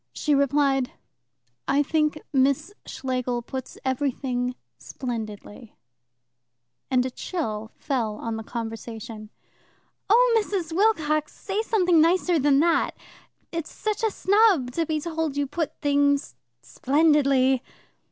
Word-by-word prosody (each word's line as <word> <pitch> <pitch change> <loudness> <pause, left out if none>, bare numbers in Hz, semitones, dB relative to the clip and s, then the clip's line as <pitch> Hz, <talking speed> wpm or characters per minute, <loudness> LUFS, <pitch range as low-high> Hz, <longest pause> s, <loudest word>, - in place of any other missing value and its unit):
She 300 - 0
replied: 275 -2 +2 0.7
"I 285 +1 +3
think 305 +1 0
Miss 280 +7 +2
Schlegel 250 -2 -2
puts 260 +2 -7
everything 255 -2 -1 0.2
splendidly"; 225 -2 -7 1.1
and 255 -1 +2
a 260 - -3
chill 220 - -4
fell 235 -7 -2
on 225 +1 -4
the 220 - -4
conversation. 225 -1 -7 0.8
"Oh, 465 +1 +5
Mrs. 350 -6 -3
Wilcox, 315 -7 +1
say 400 +2 -2
something 360 -7 +3
nicer 345 0 +3
than 280 0 +4
that. 335 0 +1 0.5
It's 330 -2 -4
such 430 -1 -3
a 445 - +3
snub 395 - +3
to 330 +4 -1
be 310 -1 0
told 320 -2 -3
you 285 - +1
put 305 +3 -4
things 285 -1 +2 0.3
splendidly. 275 -3 +3
285 Hz, 115 wpm, -25 LUFS, 250-330 Hz, 1.1 s, Oh